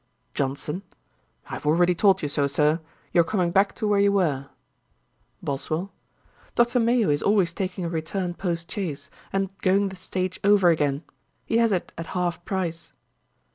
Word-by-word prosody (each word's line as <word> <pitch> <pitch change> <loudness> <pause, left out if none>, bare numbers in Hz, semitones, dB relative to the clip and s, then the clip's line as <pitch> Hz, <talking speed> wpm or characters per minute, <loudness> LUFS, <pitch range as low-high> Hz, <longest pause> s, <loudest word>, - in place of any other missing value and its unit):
JOHNSON. 140 +6 -2 0.7
'I - - -17
have - - -5
already 175 +3 +4
told 190 0 +3
you - - +1
so, 145 0 +1
Sir. 150 +3 +2 0.3
You 170 - +6
are - - +3
coming 175 -1 0
back 195 +2 +3
to 215 - -2
where 205 -1 +3
you 200 0 +4
were,' 150 -9 0 0.9
BOSWELL. 155 +7 -2 0.6
'Dr. 240 +1 +3
Mayo 230 -6 +3
is 145 - +1
always 195 -5 +2
taking 185 -1 -3
a - - -2
return 175 +3 -2
post 170 -2 -3
chaise, 150 -9 -4 0.2
and 195 0 -1
going 195 +1 +2
the 190 - -9
stage 185 0 -3
over 200 -3 +5
again. 145 -2 +1 0.4
He 230 - +1
has 230 -1 +3
it 185 -3 -1
at 165 - -5
half 175 -1 -1
price.' 170 -4 -3
180 Hz, 170 wpm, -25 LUFS, 160-195 Hz, 0.9 s, You